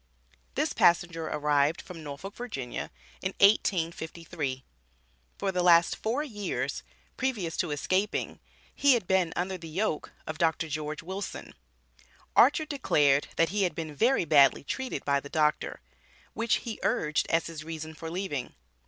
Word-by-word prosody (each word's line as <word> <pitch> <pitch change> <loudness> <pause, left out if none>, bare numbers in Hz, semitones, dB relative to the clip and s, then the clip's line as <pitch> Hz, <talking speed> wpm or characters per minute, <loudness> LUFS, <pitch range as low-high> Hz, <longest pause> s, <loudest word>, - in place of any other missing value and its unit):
This - - 0
passenger 170 -1 +3
arrived 150 +1 +2
from 170 -3 -9
Norfolk, 150 +7 -7
Va. 245 - -6
in 125 -2 -5 0.5
1853. 165 -7 +1 0.7
For 195 - -1
the 180 -1 0
last 170 -1 +5
four 240 +7 -1
years 210 -9 -3 0.4
previous 215 -11 -1
to 175 - 0
escaping, 185 +8 -1 0.3
he 280 -2 +5
had 230 - -1
been 185 -2 +2
under 185 +1 -2
the 165 -1 -9
yoke 180 -1 -2
of 155 0 -6
Dr. 165 -1 +1
George 150 +1 -4
Wilson. 190 +3 -6 0.8
Archer 295 +5 +5
declared 145 - +2
that 165 - +3
he 205 +3 -1
had 180 -5 +1
been 160 -2 -5
"very 240 - +3
badly 140 -4 +5
treated" 260 - -4
by 140 -1 +2
the 140 - -10
Doctor, 150 -1 0 0.5
which 230 0 +1
he 225 -2 -5
urged 150 0 +1
as 165 0 +2
his 160 -2 -7
reason 160 0 -6
for 160 +1 -7
leaving. 165 -7 -4
165 Hz, 145 wpm, -28 LUFS, 150-195 Hz, 0.8 s, last